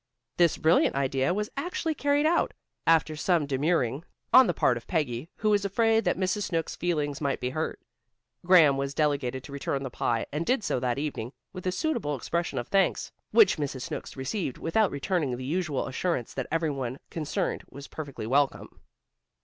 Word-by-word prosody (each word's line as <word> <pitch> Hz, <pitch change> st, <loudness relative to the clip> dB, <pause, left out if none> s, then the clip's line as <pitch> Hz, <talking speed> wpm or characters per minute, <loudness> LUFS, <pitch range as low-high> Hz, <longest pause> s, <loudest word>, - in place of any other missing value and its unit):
This 170 Hz, -2 st, +4 dB
brilliant 160 Hz, -2 st, +3 dB
idea 135 Hz, +2 st, +1 dB
was 210 Hz, +3 st, -2 dB
actually 325 Hz, +2 st, -2 dB
carried 285 Hz, 0 st, +1 dB
out, 335 Hz, +2 st, +2 dB, 0.3 s
after 160 Hz, -1 st, +4 dB
some 165 Hz, 0 st, +1 dB
demurring 140 Hz, -1 st, 0 dB, 0.3 s
on 255 Hz, -1 st, +9 dB
the 175 Hz, -, +1 dB
part 125 Hz, -, +3 dB
of 120 Hz, -, -8 dB
Peggy, 150 Hz, -4 st, -1 dB
who 215 Hz, 0 st, +1 dB
was 205 Hz, -1 st, +3 dB
afraid 225 Hz, +3 st, +2 dB
that -, -, +1 dB
Mrs. 190 Hz, +2 st, 0 dB
Snooks' 165 Hz, -2 st, -2 dB
feelings 150 Hz, -5 st, -1 dB
might 140 Hz, -2 st, 0 dB
be 125 Hz, -, -2 dB
hurt. 155 Hz, +4 st, -3 dB, 0.6 s
Graham 165 Hz, -6 st, +6 dB
was 140 Hz, 0 st, -3 dB
delegated 140 Hz, -4 st, 0 dB
to 140 Hz, -, -11 dB
return 140 Hz, 0 st, -2 dB
the 135 Hz, -, -5 dB
pie 115 Hz, -1 st, 0 dB
and 150 Hz, +3 st, -1 dB
did 250 Hz, +4 st, +1 dB
so 130 Hz, -, 0 dB
that 125 Hz, 0 st, -1 dB
evening, 140 Hz, -4 st, -4 dB, 0.2 s
with 185 Hz, -1 st, -6 dB
a -, -, +2 dB
suitable 200 Hz, -, -1 dB
expression 170 Hz, +6 st, -2 dB
of 120 Hz, -, -3 dB
thanks 195 Hz, -1 st, +1 dB, 0.2 s
which 445 Hz, -, +5 dB
Mrs. 140 Hz, -4 st, -3 dB
Snooks -, -, -6 dB
received 135 Hz, -, -3 dB
without 200 Hz, +5 st, +2 dB
returning 140 Hz, -3 st, -1 dB
the 130 Hz, -, -6 dB
usual 155 Hz, -1 st, -1 dB
assurance 135 Hz, -2 st, -2 dB
that 130 Hz, -, -3 dB
every 165 Hz, -1 st, +1 dB
one 130 Hz, -2 st, -4 dB
concerned 155 Hz, -3 st, -2 dB
was 140 Hz, 0 st, -10 dB
perfectly 140 Hz, -7 st, -7 dB
welcome. 135 Hz, +4 st, 0 dB
155 Hz, 180 wpm, -27 LUFS, 135-185 Hz, 0.6 s, on